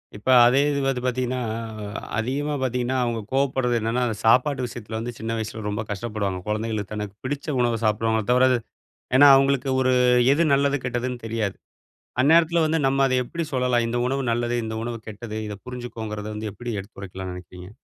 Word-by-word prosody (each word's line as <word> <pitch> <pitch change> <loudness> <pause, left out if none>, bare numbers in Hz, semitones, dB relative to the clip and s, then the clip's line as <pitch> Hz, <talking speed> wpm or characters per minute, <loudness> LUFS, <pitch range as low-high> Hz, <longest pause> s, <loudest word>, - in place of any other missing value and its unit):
இப்ப 105 - -12 0.2
அதே 125 +3 +4
இது 140 - 0
வந்து 135 -2 0
பார்த்தீங்கன்னா, 125 0 -1 0.8
அதிகமா 140 +6 -1
பார்த்தீங்கன்னா 125 0 0
அவங்க 120 -1 -1
கோவப்படுறது 130 -2 +1
என்னன்னா, 115 +3 -1
அந்த 110 - -2
சாப்பாட்டு 125 +3 +3
விஷயத்தில 115 -2 -7
வந்து 120 +2 -4
சின்ன 115 0 -3
வயசுல 110 0 -5
ரொம்ப 105 +1 -2
கஷ்டப்படுவாங்க. 105 -2 -3
குழந்தைகளுக்கு 105 -1 -2
தனக்கு 105 -2 -5
பிடிச்ச 140 +3 -4
உணவ 120 -2 +1
சாப்பிடுவாங்கள 110 +1 +1
தவிர 125 +1 +5
அது 125 - +2 0.6
ஏன்னா 145 +2 +8
அவங்களுக்கு 135 0 +2
ஒரு 130 0 +3 0.4
எது 150 +4 +3
நல்லது 140 +1 +2
கெட்டதுன்னு 125 0 -2
தெரியாது. 110 -3 -2 0.7
அந்நேரத்தில 165 +4 +4
வந்து 160 +1 +1
நம்ம 135 +1 +2
அத 130 - -1
எப்டி 165 +7 -4
சொல்லலாம். 125 -2 +2
இந்த 120 +1 -1
உணவு 135 +1 -1
நல்லது, 120 +1 0
இந்த 110 0 -4
உணவு 120 0 -4
கெட்டது 110 +1 -7
இத 105 - -5
புரிஞ்சுக்கோங்கிறத 115 -4 -6
வந்து 105 0 -4
எப்டி 120 -1 -6
எடுத்துரைக்கலாம்ன்னு 95 -2 -8
நினைக்கிறீங்க? 90 0 -11
120 Hz, 170 wpm, -24 LUFS, 110-130 Hz, 0.8 s, ஏன்னா